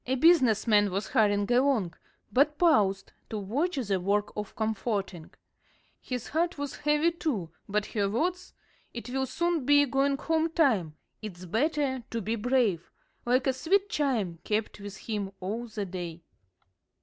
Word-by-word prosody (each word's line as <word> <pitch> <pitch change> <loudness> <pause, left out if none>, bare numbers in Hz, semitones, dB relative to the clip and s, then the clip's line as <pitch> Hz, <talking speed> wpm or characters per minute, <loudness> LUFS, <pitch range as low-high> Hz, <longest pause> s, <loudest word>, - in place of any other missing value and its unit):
A 260 - +1
business 260 - +4
man 205 -3 +4
was 195 +1 -3
hurrying 205 -3 +2
along, 245 -9 +2 0.4
but 290 +3 +3
paused 200 - +3 0.2
to 220 - -3
watch 270 - -1
the 205 -8 -1
work 205 +3 0
of 210 -1 -5
comforting. 200 -6 -2 0.7
His 250 -3 -5
heart 340 +3 0
was 285 -1 -5
heavy, 300 +3 +2
too, 245 - -3 0.2
but 210 +1 0
her 200 -3 -1
words: 355 - -2 0.4
"It 235 +1 -6
will 265 0 -1
soon 340 +2 0
be 290 +2 +5
going 275 +1 +1
home 320 +2 0
time 210 - +2 0.3
it's 185 -4 -8
better 265 - 0
to 230 - -2
be 220 +2 -2
brave," 230 -6 +1 0.4
like 250 +2 +3
a 265 - +2
sweet 390 +9 +1
chime, 225 - 0
kept 210 0 -2
with 200 -1 -8
him 205 -3 -4
all 220 +6 -4
the 215 -2 -4
day. 175 -3 -6
230 Hz, 155 wpm, -28 LUFS, 200-285 Hz, 0.7 s, be